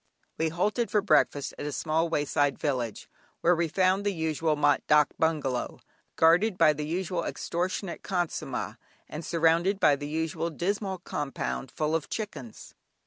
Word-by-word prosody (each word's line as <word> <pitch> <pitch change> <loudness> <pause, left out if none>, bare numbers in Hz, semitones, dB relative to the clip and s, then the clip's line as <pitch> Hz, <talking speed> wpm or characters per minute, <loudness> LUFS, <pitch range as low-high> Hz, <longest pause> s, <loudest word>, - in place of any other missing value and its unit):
We 160 0 +2
halted 210 +8 0
for 210 -2 +2
breakfast 150 -5 +2
at 145 - -3
a - - -3
small 160 +4 0
wayside 145 -2 +1
village, 125 -7 -2 0.3
where 175 +1 +4
we 170 0 0
found 185 +4 +2
the 205 - +1
usual 160 -2 0
mat 145 -1 +3
"dâk" 150 -1 +5
bungalow, 150 -6 -1 0.4
guarded 180 +5 +4
by 155 - +5
the 150 0 -4
usual 175 +1 -2
extortionate 175 +2 -3
khansamah, 175 -3 -3 0.3
and 155 +2 -7
surrounded 170 +4 +2
by 150 -6 +5
the 145 +1 -6
usual 160 +1 -2
dismal 190 +3 -2
compound 135 -2 -3
full 155 +4 -2
of 165 -2 -1
chickens. 150 - -6
160 Hz, 150 wpm, -28 LUFS, 150-180 Hz, 0.4 s, dâk